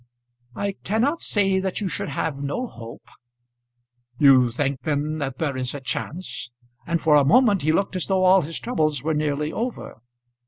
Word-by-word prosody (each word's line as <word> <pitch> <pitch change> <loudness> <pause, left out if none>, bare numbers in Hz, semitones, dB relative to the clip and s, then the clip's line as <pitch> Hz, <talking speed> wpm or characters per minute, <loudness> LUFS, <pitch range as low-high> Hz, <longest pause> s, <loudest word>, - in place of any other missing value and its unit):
"I 200 0 -2
cannot 250 - 0
say 195 -2 +1
that 190 -1 -2
you 205 - -2
should 170 - -3
have 140 0 -3
no 145 - -2
hope." 115 - -11 1.1
"You 130 -4 +6
think 135 +2 -2
then 150 +2 -2
that 135 -3 -4
there 145 -3 -2
is 130 +1 -2
a - - -4
chance?" 135 +3 -5 0.4
and 170 -1 0
for 160 -2 +2
a 145 - +6
moment 210 - +4
he 155 - +2
looked 195 +4 0
as 185 - -1
though 190 -1 +1
all 185 +1 +6
his 165 0 -5
troubles 155 - -1
were 160 +1 0
nearly 150 0 -1
over. 235 - -5
155 Hz, 180 wpm, -23 LUFS, 140-190 Hz, 1.1 s, You